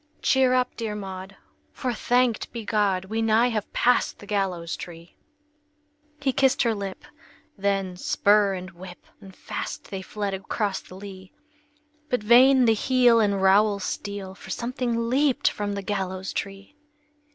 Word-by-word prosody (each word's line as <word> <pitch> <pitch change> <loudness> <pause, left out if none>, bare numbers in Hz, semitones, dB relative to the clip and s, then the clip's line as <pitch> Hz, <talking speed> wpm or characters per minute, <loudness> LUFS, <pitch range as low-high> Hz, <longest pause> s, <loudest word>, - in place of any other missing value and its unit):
"Cheer 260 -1 +4
up, 250 0 0
dear 220 -3 -4
Maud, 190 -1 -7 0.4
for, 255 -3 -3
thanked 245 0 +1
be 230 -3 -6
God, 200 -4 +1
We 220 +3 -2
nigh 225 +2 +3
have 215 -3 -3
passed 250 - +2
the - - -12
gallows 190 -5 -2
tree!" 170 -1 -11 1.0
He 275 -2 0
kissed 270 +1 +3
her 230 -2 +2
lip; 200 -2 -6 0.5
then 195 -2 -1
spur 200 +1 +3
and 185 0 -7
whip! 180 0 -12
And 195 -2 -14
fast - - -6
they 195 -1 -4
fled 205 +1 -4
across 195 +1 -2
the 185 - -14
lea! 190 -1 -10 0.8
But 250 -4 0
vain 255 +3 +6
the 225 - +5
heel 245 +1 +4
and 200 -3 +1
rowel 200 +2 +4
steel, 200 0 -5
For 190 - -13
something 235 -1 -2
leaped 270 +2 +2
from 205 -1 -3
the 200 0 -4
gallows 190 -1 -3
tree! 195 +5 -6
205 Hz, 150 wpm, -25 LUFS, 190-235 Hz, 1.0 s, vain